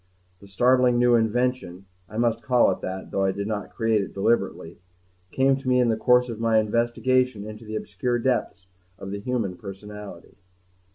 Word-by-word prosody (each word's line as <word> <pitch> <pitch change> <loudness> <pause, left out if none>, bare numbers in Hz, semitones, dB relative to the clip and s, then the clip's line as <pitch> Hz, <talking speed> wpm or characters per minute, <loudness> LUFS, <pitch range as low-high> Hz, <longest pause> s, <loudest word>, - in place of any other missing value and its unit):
The 100 - -15
startling 125 +4 +3
new 120 0 +4
invention 115 -5 0 0.2
I 110 - -8
must 115 -1 +1
call 120 -2 +3
it 95 - -5
that, 95 0 -6
though 95 - 0
I 95 - +2
did 100 +1 -4
not 105 -1 -4
create 115 -2 0
it 100 - -7
deliberately 95 -5 -1 0.5
came 135 +4 +2
to 135 -1 -9
me 125 0 +3
in 125 -1 +3
the 110 - +2
course 125 +2 +3
of 115 -2 -6
my 115 -1 +2
investigations 120 +1 +1
into 110 +1 -9
the 110 0 -6
obscure 110 +4 -2
depths 115 -6 -2 0.3
of 95 0 -8
the 100 - -4
human 110 -5 -2
personality. 100 -1 -10
110 Hz, 180 wpm, -24 LUFS, 100-125 Hz, 0.5 s, new